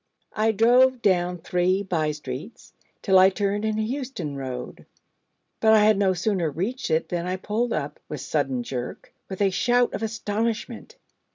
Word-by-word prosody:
I 220 Hz, +1 st, +2 dB
drove 245 Hz, +4 st, +4 dB
down 180 Hz, -2 st, +2 dB
three 180 Hz, +3 st, 0 dB
by 160 Hz, -5 st, 0 dB
streets, 145 Hz, -, -8 dB, 0.3 s
till 190 Hz, -2 st, +5 dB
I 190 Hz, +1 st, +7 dB
turned 200 Hz, +1 st, -1 dB
into 220 Hz, 0 st, 0 dB
Euston 240 Hz, -, -4 dB
Road: 130 Hz, -2 st, -7 dB, 0.7 s
but 220 Hz, 0 st, +5 dB
I 215 Hz, -1 st, +6 dB
had 215 Hz, 0 st, +5 dB
no 190 Hz, -2 st, +2 dB
sooner 180 Hz, -2 st, 0 dB
reached 200 Hz, -, -3 dB
it 160 Hz, +1 st, 0 dB
than 175 Hz, 0 st, -2 dB
I 185 Hz, -, -1 dB
pulled 220 Hz, +5 st, -2 dB
up -, -, -3 dB
with -, -, -5 dB
sudden 250 Hz, -2 st, -1 dB
jerk 125 Hz, -, -6 dB, 0.2 s
with 190 Hz, +1 st, -2 dB
a 195 Hz, -, +3 dB
shout 245 Hz, +5 st, +2 dB
of -, -, -4 dB
astonishment. 225 Hz, -, -3 dB
200 Hz, 165 wpm, -24 LUFS, 175-225 Hz, 0.7 s, I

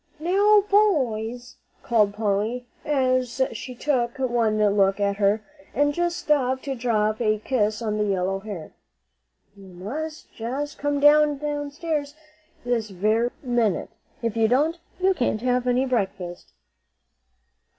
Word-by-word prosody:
"Now, 405 Hz, +6 st, +4 dB
boys," 250 Hz, -, +1 dB, 0.3 s
called 210 Hz, -4 st, +2 dB
Polly, 215 Hz, +3 st, -1 dB, 0.2 s
as 255 Hz, -3 st, 0 dB
she 250 Hz, +3 st, -7 dB
took 245 Hz, -3 st, -1 dB
one 235 Hz, -4 st, +1 dB, 0.2 s
look 195 Hz, 0 st, +3 dB
at 200 Hz, -1 st, 0 dB
her, 205 Hz, +1 st, +2 dB, 0.3 s
and 290 Hz, +1 st, +2 dB
just 345 Hz, +2 st, -1 dB
stopped 260 Hz, -5 st, +1 dB
to 275 Hz, -, -3 dB
drop 220 Hz, -3 st, 0 dB
a 215 Hz, -2 st, +2 dB
kiss 215 Hz, -1 st, -1 dB
on 215 Hz, -1 st, -1 dB
the 210 Hz, -, +2 dB
yellow 195 Hz, -1 st, 0 dB
hair, 195 Hz, -6 st, -8 dB, 0.8 s
"you 195 Hz, -1 st, -14 dB
must 260 Hz, -, -7 dB
just 270 Hz, +6 st, -4 dB
come 290 Hz, 0 st, 0 dB
downstairs 295 Hz, +1 st, +2 dB, 0.5 s
this 235 Hz, -3 st, 0 dB
very 215 Hz, +5 st, +1 dB
minute. 240 Hz, -6 st, 0 dB, 0.3 s
If 230 Hz, -1 st, -1 dB
you 225 Hz, -1 st, +3 dB
don't, 300 Hz, +8 st, +1 dB, 0.2 s
you 380 Hz, +1 st, +3 dB
can't 240 Hz, -, -1 dB
have 250 Hz, 0 st, 0 dB
any 250 Hz, +2 st, +2 dB
breakfast." 190 Hz, -, -3 dB
245 Hz, 130 wpm, -24 LUFS, 215-290 Hz, 0.8 s, Now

